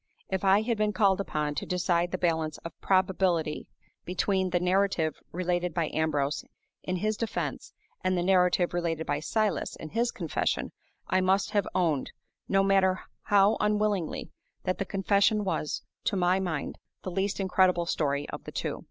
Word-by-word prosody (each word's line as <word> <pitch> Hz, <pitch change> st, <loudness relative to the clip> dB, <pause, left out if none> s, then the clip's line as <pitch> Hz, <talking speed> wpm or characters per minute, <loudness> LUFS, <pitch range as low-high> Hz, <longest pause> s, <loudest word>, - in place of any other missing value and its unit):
If 190 Hz, 0 st, -1 dB
I 195 Hz, +2 st, +5 dB
had 230 Hz, -1 st, -1 dB
been 210 Hz, 0 st, +1 dB
called 195 Hz, -1 st, +3 dB
upon 150 Hz, -5 st, -2 dB
to -, -, -4 dB
decide 175 Hz, -1 st, +1 dB
the 185 Hz, -, -2 dB
balance 160 Hz, -3 st, 0 dB
of 170 Hz, -, -4 dB
probability 185 Hz, -4 st, +1 dB, 0.4 s
between 185 Hz, +1 st, 0 dB
the 175 Hz, -, +1 dB
narrative 180 Hz, -3 st, +1 dB, 0.2 s
related 175 Hz, -1 st, -1 dB
by 165 Hz, -3 st, 0 dB
Ambrose 150 Hz, -2 st, 0 dB, 0.4 s
in 185 Hz, -, -2 dB
his 215 Hz, +4 st, 0 dB
defense 230 Hz, -1 st, -3 dB, 0.3 s
and 185 Hz, 0 st, +1 dB
the 175 Hz, -, 0 dB
narrative 180 Hz, -1 st, +3 dB
related 165 Hz, -2 st, -1 dB
by 145 Hz, 0 st, -1 dB
Silas 210 Hz, +4 st, -1 dB
in 160 Hz, -, -8 dB
his 235 Hz, +5 st, +1 dB
confession, 170 Hz, -9 st, -2 dB, 0.4 s
I 185 Hz, -, +2 dB
must 190 Hz, +2 st, +2 dB
have 205 Hz, -3 st, +1 dB
owned, 160 Hz, -7 st, +1 dB, 0.4 s
no 195 Hz, 0 st, +4 dB
matter 190 Hz, -1 st, +3 dB, 0.2 s
how 205 Hz, +1 st, +4 dB
unwillingly, 210 Hz, -5 st, 0 dB, 0.3 s
that 185 Hz, -, -1 dB
the 195 Hz, -, -1 dB
confession 200 Hz, +2 st, +2 dB
was, 185 Hz, -5 st, -2 dB, 0.2 s
to 205 Hz, -, +1 dB
my 185 Hz, 0 st, +2 dB
mind, 160 Hz, -7 st, -3 dB, 0.2 s
the 185 Hz, -, -4 dB
least 195 Hz, +3 st, -1 dB
incredible 185 Hz, -2 st, +3 dB
story 145 Hz, -4 st, -1 dB
of -, -, -7 dB
the -, -, -7 dB
two. -, -, -3 dB
185 Hz, 165 wpm, -28 LUFS, 170-195 Hz, 0.4 s, I